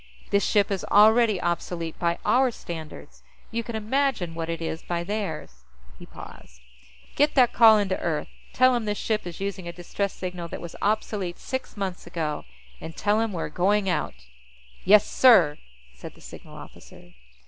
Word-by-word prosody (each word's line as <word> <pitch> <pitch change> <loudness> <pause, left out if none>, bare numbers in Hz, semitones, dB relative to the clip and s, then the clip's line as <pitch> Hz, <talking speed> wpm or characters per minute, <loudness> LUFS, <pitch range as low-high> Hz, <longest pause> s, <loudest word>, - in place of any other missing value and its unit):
This 200 0 +3
ship 205 -1 +2
is 195 - -2
already 215 -1 +5
obsolete 170 -1 -3
by 170 -1 0
our 260 +1 +4
standards; 165 -8 -9 0.3
you 230 0 -2
can 230 0 -6
imagine 220 -5 -1
what 165 0 -5
it 165 -1 -3
is 165 -1 -4
by 170 -1 -3
theirs." 165 - -5 0.4
He - - -12
paused. - - -13 0.6
"Get 295 +1 +2
that 250 -3 +4
call 225 -2 +7
in 205 -1 0
to 190 - -1
Earth. 160 -3 -2 0.2
Tell 255 0 +4
'em 240 -2 -1
this 210 -1 -2
ship 215 -3 -2
is 170 - -8
using 195 -2 -4
a - - -4
distress 180 +3 -4
signal 180 -2 -6
that - - -7
was 170 - -9
obsolete 205 -3 -1
six 260 -4 -6
months 190 -3 -4
ago. 155 -3 -3 0.3
And 160 - -9
tell 210 +1 +1
'em 225 -1 -1
we're 170 -4 -4
going 195 +2 +1
out." 150 - -2 0.7
"Yes, 210 +2 +6
sir," 185 - +5 0.3
said - - -11
the - - -19
signal - - -12
officer. - - -14
195 Hz, 175 wpm, -25 LUFS, 170-220 Hz, 0.7 s, call